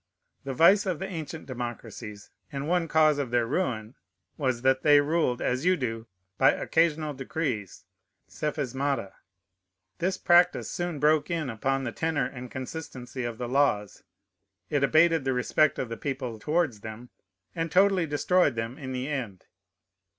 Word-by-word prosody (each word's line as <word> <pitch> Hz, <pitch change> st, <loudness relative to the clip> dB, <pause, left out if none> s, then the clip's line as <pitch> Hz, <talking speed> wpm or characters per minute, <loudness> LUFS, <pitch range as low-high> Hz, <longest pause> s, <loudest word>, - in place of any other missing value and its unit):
The 135 Hz, -1 st, -4 dB
vice 195 Hz, -, +5 dB
of 180 Hz, -4 st, 0 dB
the 190 Hz, -, -4 dB
ancient 160 Hz, -3 st, -6 dB
democracies, 120 Hz, -4 st, -7 dB, 0.2 s
and 140 Hz, 0 st, -4 dB
one 175 Hz, 0 st, +1 dB
cause 155 Hz, -2 st, +4 dB
of 140 Hz, -4 st, -2 dB
their 120 Hz, -1 st, +2 dB
ruin, 115 Hz, -6 st, -2 dB, 0.4 s
was, 130 Hz, -4 st, -1 dB
that 130 Hz, 0 st, +3 dB
they 145 Hz, 0 st, +6 dB
ruled, 145 Hz, -4 st, +1 dB
as 125 Hz, +3 st, 0 dB
you 185 Hz, +1 st, +3 dB
do, 115 Hz, -4 st, -4 dB, 0.3 s
by -, -, +7 dB
occasional 160 Hz, -2 st, +1 dB
decrees, 130 Hz, -, -4 dB, 0.4 s
psephismata. 140 Hz, -6 st, -2 dB, 0.9 s
This 185 Hz, +2 st, 0 dB
practice 175 Hz, +1 st, +3 dB
soon 175 Hz, -3 st, -3 dB
broke 150 Hz, +1 st, +3 dB
in 160 Hz, -7 st, -2 dB
upon 135 Hz, +4 st, -1 dB
the 120 Hz, -, -3 dB
tenor 160 Hz, +2 st, -1 dB
and 125 Hz, -1 st, -7 dB
consistency 130 Hz, -2 st, -6 dB
of 120 Hz, -1 st, -4 dB
the 125 Hz, 0 st, -4 dB
laws; 120 Hz, -6 st, +1 dB, 0.7 s
it 145 Hz, -2 st, +1 dB
abated 160 Hz, +1 st, +4 dB
the 135 Hz, 0 st, 0 dB
respect 145 Hz, +4 st, +2 dB
of 125 Hz, -, -3 dB
the 115 Hz, -, -5 dB
people 130 Hz, -3 st, -4 dB
towards 150 Hz, -5 st, 0 dB
them, 110 Hz, +3 st, -9 dB, 0.4 s
and 165 Hz, -1 st, -2 dB
totally 190 Hz, -2 st, +4 dB
destroyed 150 Hz, 0 st, +2 dB
them 115 Hz, +2 st, -4 dB
in 130 Hz, -2 st, -5 dB
the 130 Hz, +1 st, -3 dB
end. 125 Hz, -11 st, -4 dB
140 Hz, 155 wpm, -27 LUFS, 125-160 Hz, 0.9 s, by